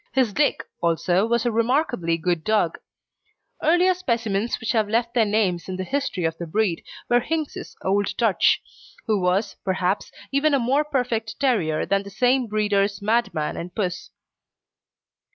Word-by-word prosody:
His 250 Hz, -5 st, +2 dB
Dick, 295 Hz, +4 st, +1 dB, 0.2 s
also, 175 Hz, +4 st, +2 dB
was 235 Hz, 0 st, +1 dB
a 240 Hz, -, +2 dB
remarkably 230 Hz, -, +1 dB
good 170 Hz, -1 st, -1 dB
dog. 210 Hz, -6 st, +1 dB, 0.8 s
Earlier 350 Hz, +4 st, +4 dB
specimens 230 Hz, -, -1 dB
which 225 Hz, -, -2 dB
have 215 Hz, -3 st, +1 dB
left 235 Hz, +2 st, 0 dB
their 230 Hz, -3 st, +3 dB
names 195 Hz, -5 st, 0 dB
in 185 Hz, -, -3 dB
the 185 Hz, -, -3 dB
history 270 Hz, -5 st, -2 dB
of 160 Hz, 0 st, 0 dB
the 170 Hz, -, -5 dB
breed 190 Hz, 0 st, 0 dB, 0.2 s
were 240 Hz, -, +4 dB
Hinks's 310 Hz, +4 st, -4 dB
Old 200 Hz, +1 st, 0 dB
Dutch, 225 Hz, -5 st, +3 dB, 0.4 s
who 215 Hz, -3 st, +1 dB
was, 190 Hz, +3 st, 0 dB
perhaps, 190 Hz, 0 st, -1 dB, 0.2 s
even 280 Hz, +1 st, +3 dB
a -, -, +2 dB
more 265 Hz, +5 st, +2 dB
perfect 245 Hz, -7 st, -2 dB
terrier 200 Hz, -, +1 dB
than 200 Hz, 0 st, +1 dB
the 200 Hz, -, -10 dB
same 245 Hz, +4 st, +2 dB
breeder's 205 Hz, -1 st, +1 dB
Madman 210 Hz, -8 st, 0 dB
and 180 Hz, +1 st, -7 dB
Puss. 185 Hz, -4 st, -3 dB
215 Hz, 155 wpm, -23 LUFS, 185-245 Hz, 0.8 s, Earlier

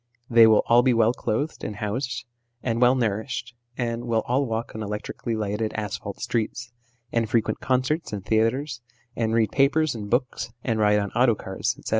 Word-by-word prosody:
They 115 Hz, -1 st, +8 dB
will 110 Hz, -1 st, +5 dB
all 120 Hz, +1 st, +6 dB
be 125 Hz, -1 st, +3 dB
well 115 Hz, +1 st, +4 dB
clothed 140 Hz, +6 st, -2 dB
and 105 Hz, -, -4 dB
housed, 115 Hz, +3 st, -3 dB, 0.4 s
and 115 Hz, -1 st, -1 dB
well 125 Hz, +1 st, +6 dB
nourished, 120 Hz, +1 st, -2 dB, 0.2 s
and 120 Hz, -1 st, -2 dB
will 115 Hz, -2 st, +1 dB
all 130 Hz, +3 st, +1 dB
walk 115 Hz, +1 st, -3 dB
on 110 Hz, -, -6 dB
electrically 105 Hz, +2 st, -4 dB
lighted 110 Hz, +1 st, -2 dB
asphalt 100 Hz, -1 st, -5 dB
streets, 115 Hz, 0 st, -2 dB, 0.4 s
and 115 Hz, -2 st, 0 dB
frequent 115 Hz, -2 st, +1 dB
concerts 130 Hz, +5 st, 0 dB
and 100 Hz, -2 st, -5 dB
theatres, 120 Hz, +4 st, 0 dB, 0.3 s
and 115 Hz, -1 st, 0 dB
read 110 Hz, -2 st, +2 dB
papers 145 Hz, +3 st, +3 dB
and 105 Hz, -3 st, -6 dB
books, 125 Hz, -1 st, -1 dB
and 115 Hz, -3 st, 0 dB
ride 105 Hz, -1 st, +4 dB
on 100 Hz, -1 st, -1 dB
auto 120 Hz, -1 st, +3 dB
cars, 95 Hz, -1 st, -3 dB
etc. -, -, -7 dB
115 Hz, 180 wpm, -25 LUFS, 110-125 Hz, 0.4 s, They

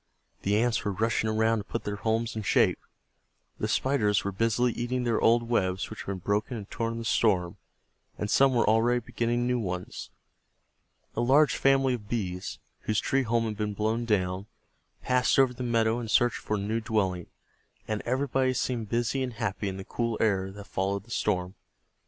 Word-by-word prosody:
The 100 Hz, +1 st, +1 dB
Ants 120 Hz, +1 st, +1 dB
were 100 Hz, -, -1 dB
rushing 110 Hz, +1 st, 0 dB
around 110 Hz, +1 st, +2 dB
to -, -, -5 dB
put -, -, -4 dB
their 105 Hz, 0 st, -3 dB
homes 110 Hz, +1 st, -1 dB
in 110 Hz, -, -2 dB
shape, 100 Hz, -, +3 dB, 0.8 s
the -, -, -1 dB
Spiders 105 Hz, -7 st, +1 dB
were 100 Hz, -, -2 dB
busily 115 Hz, +4 st, +1 dB
eating 125 Hz, +1 st, -2 dB
their 115 Hz, -2 st, +1 dB
old 120 Hz, +1 st, +4 dB
webs, 95 Hz, -5 st, -1 dB
which 110 Hz, -, -8 dB
had -, -, -23 dB
been 100 Hz, -1 st, -2 dB
broken 105 Hz, +6 st, -1 dB
and 100 Hz, -2 st, -7 dB
torn 115 Hz, 0 st, -2 dB
in -, -, -5 dB
the 115 Hz, -, -5 dB
storm, 95 Hz, -6 st, +1 dB, 0.6 s
and 105 Hz, -, -2 dB
some 135 Hz, +4 st, +4 dB
were 115 Hz, -, +3 dB
already 115 Hz, +3 st, +3 dB
beginning 120 Hz, +1 st, -1 dB
new 125 Hz, 0 st, +1 dB
ones. 90 Hz, -4 st, -5 dB, 1.1 s
A 115 Hz, -, 0 dB
large 140 Hz, +5 st, +4 dB
family 135 Hz, -1 st, +3 dB
of 105 Hz, -4 st, -6 dB
Bees, 95 Hz, -6 st, -3 dB, 0.2 s
whose 110 Hz, -1 st, 0 dB
tree 135 Hz, -, +1 dB
home 115 Hz, -1 st, +1 dB
had 110 Hz, -2 st, -3 dB
been 105 Hz, -1 st, -2 dB
blown 110 Hz, +3 st, 0 dB
down, 95 Hz, -2 st, 0 dB, 0.6 s
passed 125 Hz, 0 st, +2 dB
over 135 Hz, -2 st, +4 dB
the 125 Hz, -, -8 dB
meadow 115 Hz, -1 st, +1 dB
in 120 Hz, -, -5 dB
search 120 Hz, +1 st, +3 dB
for 105 Hz, -, -3 dB
a -, -, -2 dB
new 110 Hz, +3 st, -1 dB
dwelling, 95 Hz, -6 st, -1 dB, 0.6 s
and 110 Hz, -1 st, -2 dB
everybody 130 Hz, 0 st, 0 dB
seemed 115 Hz, -4 st, -2 dB
busy 120 Hz, +4 st, 0 dB
and 125 Hz, -2 st, -2 dB
happy 110 Hz, -3 st, -2 dB
in 95 Hz, -, -5 dB
the 95 Hz, -, -7 dB
cool 115 Hz, -2 st, -2 dB
air 95 Hz, -3 st, +1 dB
that 100 Hz, +1 st, -9 dB
followed 100 Hz, 0 st, -2 dB
the 115 Hz, -, -17 dB
storm. 90 Hz, -5 st, -1 dB
110 Hz, 195 wpm, -28 LUFS, 105-120 Hz, 1.1 s, old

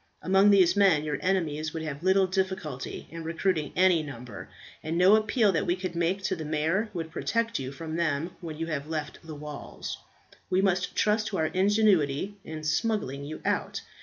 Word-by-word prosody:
Among 195 Hz, +2 st, +5 dB
these 185 Hz, -3 st, +5 dB
men 190 Hz, -7 st, +4 dB
your 150 Hz, -2 st, -2 dB
enemies 160 Hz, -4 st, -1 dB
would 160 Hz, -, -3 dB
have 150 Hz, -2 st, -5 dB
little 190 Hz, +1 st, +4 dB
difficulty 190 Hz, -7 st, -3 dB
in 165 Hz, 0 st, -7 dB
recruiting 165 Hz, -2 st, -1 dB
any 180 Hz, -3 st, +4 dB
number, 125 Hz, -7 st, -8 dB, 0.3 s
and 160 Hz, +2 st, -2 dB
no 185 Hz, +4 st, +7 dB
appeal 215 Hz, 0 st, +3 dB
that 165 Hz, -, -1 dB
we 175 Hz, -, +2 dB
could 185 Hz, -2 st, -5 dB
make 175 Hz, +4 st, 0 dB
to 190 Hz, -, 0 dB
the 160 Hz, -, -6 dB
mayor 160 Hz, +8 st, 0 dB
would 165 Hz, -4 st, -5 dB
protect 230 Hz, +3 st, -1 dB
you 130 Hz, 0 st, -4 dB
from 160 Hz, +3 st, -6 dB
them 165 Hz, 0 st, 0 dB
when 160 Hz, -3 st, -6 dB
you 165 Hz, -, -2 dB
have 150 Hz, -3 st, -3 dB
left 155 Hz, -2 st, -4 dB
the 160 Hz, -1 st, -8 dB
walls. 150 Hz, 0 st, -7 dB, 0.5 s
We 185 Hz, 0 st, +2 dB
must 190 Hz, -1 st, +1 dB
trust 215 Hz, +1 st, +2 dB
to 195 Hz, -, -3 dB
our 160 Hz, -, +1 dB
ingenuity 190 Hz, -3 st, +2 dB
in 155 Hz, -1 st, -7 dB
smuggling 155 Hz, -, -1 dB
you 155 Hz, +2 st, -7 dB
out. -, -, -1 dB
170 Hz, 190 wpm, -28 LUFS, 155-190 Hz, 0.5 s, no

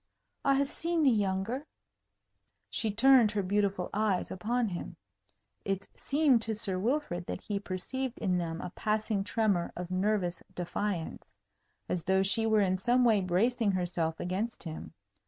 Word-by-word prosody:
"I 275 Hz, -1 st, +4 dB
have 275 Hz, 0 st, +1 dB
seen 335 Hz, -1 st, 0 dB
the 270 Hz, -, +6 dB
younger." 210 Hz, +6 st, -1 dB, 1.0 s
She 220 Hz, -, +1 dB
turned 240 Hz, +2 st, +6 dB
her 205 Hz, -2 st, 0 dB
beautiful 200 Hz, -1 st, 0 dB
eyes 210 Hz, -3 st, 0 dB
upon 230 Hz, +6 st, 0 dB
him. 175 Hz, -1 st, -6 dB, 0.7 s
It 195 Hz, 0 st, -2 dB
seemed 280 Hz, -5 st, +3 dB
to 225 Hz, -1 st, -1 dB
Sir 195 Hz, -4 st, -2 dB
Wilfrid 215 Hz, -, -1 dB
that -, -, -4 dB
he 205 Hz, -2 st, -3 dB
perceived 230 Hz, +7 st, -4 dB
in 185 Hz, -4 st, 0 dB
them 165 Hz, -1 st, -3 dB
a -, -, -6 dB
passing 215 Hz, -1 st, -1 dB
tremor 205 Hz, -4 st, +1 dB
of 180 Hz, 0 st, -6 dB
nervous 185 Hz, -2 st, 0 dB
defiance, 180 Hz, 0 st, -3 dB, 0.6 s
as 175 Hz, -2 st, -1 dB
though 190 Hz, +2 st, +3 dB
she 225 Hz, +3 st, +2 dB
were 220 Hz, -1 st, +4 dB
in 185 Hz, -1 st, +1 dB
some 245 Hz, +4 st, +3 dB
way 220 Hz, -4 st, +4 dB
bracing 200 Hz, +4 st, +1 dB
herself 175 Hz, -3 st, -1 dB
against 195 Hz, +6 st, -3 dB
him. 160 Hz, -3 st, -7 dB
205 Hz, 155 wpm, -30 LUFS, 185-230 Hz, 1.0 s, the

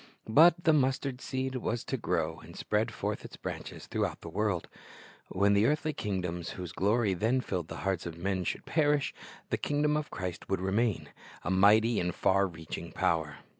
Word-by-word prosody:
But 165 Hz, +9 st, +6 dB
the 160 Hz, -, +5 dB
mustard 135 Hz, -2 st, +1 dB
seed 130 Hz, 0 st, -2 dB
was 120 Hz, -1 st, -2 dB
to -, -, -2 dB
grow 85 Hz, -8 st, -1 dB
and 85 Hz, -, -13 dB
spread 110 Hz, +3 st, 0 dB
forth -, -, -3 dB
its -, -, -10 dB
branches -, -, -6 dB
throughout -, -, -2 dB
the 85 Hz, -, -7 dB
world. 100 Hz, -1 st, -1 dB, 0.6 s
When 100 Hz, +2 st, +2 dB
the 100 Hz, +2 st, +4 dB
eartMy 155 Hz, +2 st, +1 dB
kingdoms 90 Hz, -, -3 dB
whose 90 Hz, -3 st, -6 dB
glory 105 Hz, +2 st, +2 dB
then 115 Hz, +8 st, +1 dB
filled 90 Hz, -9 st, -3 dB
the -, -, -7 dB
hearts 95 Hz, -3 st, 0 dB
of 85 Hz, -1 st, -7 dB
men 95 Hz, +1 st, -1 dB
should -, -, -3 dB
perish, 150 Hz, -3 st, +2 dB, 0.4 s
the -, -, +2 dB
kingdom 150 Hz, +1 st, +1 dB
of 150 Hz, -1 st, -2 dB
Christ 90 Hz, -2 st, -5 dB
would 95 Hz, -, +1 dB
remain, 100 Hz, +2 st, 0 dB, 0.3 s
a -, -, -1 dB
mighty 105 Hz, +4 st, +5 dB
and 90 Hz, 0 st, -1 dB
far 100 Hz, +1 st, +3 dB
reaclung 80 Hz, -3 st, -7 dB
power. 80 Hz, -3 st, +1 dB
100 Hz, 180 wpm, -30 LUFS, 90-130 Hz, 0.6 s, But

